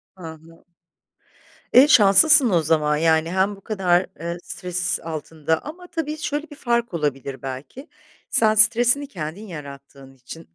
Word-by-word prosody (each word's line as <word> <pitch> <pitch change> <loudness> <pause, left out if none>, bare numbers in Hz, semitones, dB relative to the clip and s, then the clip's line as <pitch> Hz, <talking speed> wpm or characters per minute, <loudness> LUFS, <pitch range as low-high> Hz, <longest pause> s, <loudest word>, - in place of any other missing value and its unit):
Hı 185 - -15
hı. 160 +1 -13 1.1
Eee, 265 +4 +7
şanslısın 250 +4 +6
o 170 -4 +1
zaman, 150 -1 0
yani, 160 +1 +1
hem 190 +2 -1
bu 195 - -19
kadar, 185 -4 0
eee, 170 +2 -5
stres 180 0 -2
altında 160 0 -4
ama, 355 +5 -11
tabii, 315 -2 -5
şöyle 300 0 -5
bir 290 - -12
fark 235 - -2
olabilir 140 -4 -4
belki, 135 - -9 0.4
sen 220 -6 +3
stresini 240 +6 +4
kendin 185 - -8
yarattığın 140 -4 -12
için 135 - -13
180 Hz, 140 wpm, -21 LUFS, 155-240 Hz, 1.1 s, Eee